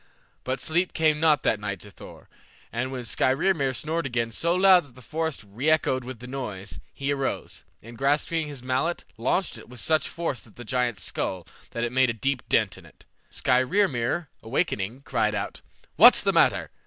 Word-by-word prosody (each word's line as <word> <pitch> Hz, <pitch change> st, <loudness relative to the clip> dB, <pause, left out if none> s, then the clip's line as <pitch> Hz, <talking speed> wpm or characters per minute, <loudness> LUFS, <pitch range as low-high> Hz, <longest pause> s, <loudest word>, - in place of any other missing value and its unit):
But 130 Hz, +1 st, -2 dB
sleep 175 Hz, +3 st, 0 dB
came 155 Hz, -2 st, +2 dB
not 155 Hz, -2 st, +3 dB
that 105 Hz, -, +2 dB
night 100 Hz, -2 st, -4 dB
to 105 Hz, -, -13 dB
Thor, -, -, -13 dB, 0.5 s
and 125 Hz, +3 st, -2 dB
when 130 Hz, -2 st, -5 dB
Skrymir 135 Hz, +4 st, +1 dB
snored 155 Hz, +5 st, -2 dB
again 120 Hz, -2 st, -1 dB
so 170 Hz, +9 st, 0 dB
loud 185 Hz, -1 st, +6 dB
that 125 Hz, -4 st, -20 dB
the 130 Hz, -, -14 dB
forest 160 Hz, 0 st, -3 dB
reechoed 130 Hz, +5 st, +1 dB
with 130 Hz, 0 st, -7 dB
the 120 Hz, -, -11 dB
noise, 105 Hz, -7 st, -6 dB
he 140 Hz, +1 st, -3 dB
arose, 135 Hz, -1 st, -3 dB, 0.2 s
and 115 Hz, +1 st, -12 dB
grasping 150 Hz, +3 st, +1 dB
his 140 Hz, -4 st, -9 dB
mallet 130 Hz, +7 st, -1 dB
launched 130 Hz, -, -1 dB
it -, -, -14 dB
with 125 Hz, -1 st, -8 dB
such 155 Hz, +4 st, +1 dB
force 155 Hz, -9 st, -4 dB
at 110 Hz, -, -20 dB
the 120 Hz, -, -9 dB
giant's 120 Hz, -3 st, -1 dB
skull 90 Hz, -3 st, -3 dB, 0.2 s
that 115 Hz, -, -4 dB
it 120 Hz, -, -1 dB
made 130 Hz, 0 st, +3 dB
a -, -, 0 dB
deep 130 Hz, +3 st, -1 dB
dint -, -, +2 dB
in -, -, -17 dB
it. -, -, -21 dB, 0.2 s
Skrymir, 130 Hz, -, +1 dB, 0.2 s
awakening, 115 Hz, -, -2 dB
cried 110 Hz, -5 st, 0 dB
out, 100 Hz, 0 st, -4 dB, 0.4 s
"What's -, -, +8 dB
the -, -, +2 dB
matter? -, -, +3 dB
130 Hz, 185 wpm, -26 LUFS, 115-155 Hz, 0.5 s, What's